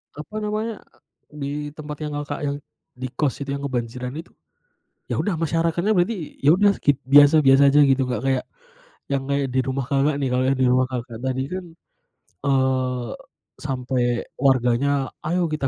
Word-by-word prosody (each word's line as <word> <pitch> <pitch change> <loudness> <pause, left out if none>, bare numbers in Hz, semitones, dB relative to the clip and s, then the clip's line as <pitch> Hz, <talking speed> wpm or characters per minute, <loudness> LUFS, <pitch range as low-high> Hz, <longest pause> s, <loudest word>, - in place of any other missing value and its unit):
Apa 150 +8 -9
namanya, 215 +1 -3 0.5
e - - -20
di 140 - -2 0.2
tempat 150 0 -8
yang 150 0 -3
Kakak 145 0 -5
yang 140 -1 -1 0.4
di 130 - -4
kos 140 0 0
itu 140 0 -3
yang 140 - -5
kebanjiran 125 -2 -3
itu, 165 - -10 0.8
ya - - -2
udah 205 - 0
masyarakatnya 165 +4 +1
berarti, 175 -2 -1
ya 145 - +7
udah 200 +3 +4
skip 140 -1 +1
biasa-biasa 140 -1 +7
aja 145 - +6
gitu, 135 -1 +4
Kak, 125 -4 -2
kayak, 130 -1 +1 0.7
yang 135 -1 -1
kayak 140 0 0
di 130 +1 +1
rumah 135 0 -2
Kakak 140 +2 +2
nih. 135 - 0
Kalau 125 +1 +1
yang 135 0 +1
di - - +4
rumah 130 +1 +3
Kakak 125 -3 -6
tadi 130 0 -1
kan, 185 0 -4 0.8
eee, 130 -3 +1 0.5
sampai 130 -3 -2 0.3
warganya, 130 0 +2 0.4
ayo 175 +3 +1
kita 155 -3 -2
140 Hz, 170 wpm, -23 LUFS, 130-150 Hz, 0.8 s, ya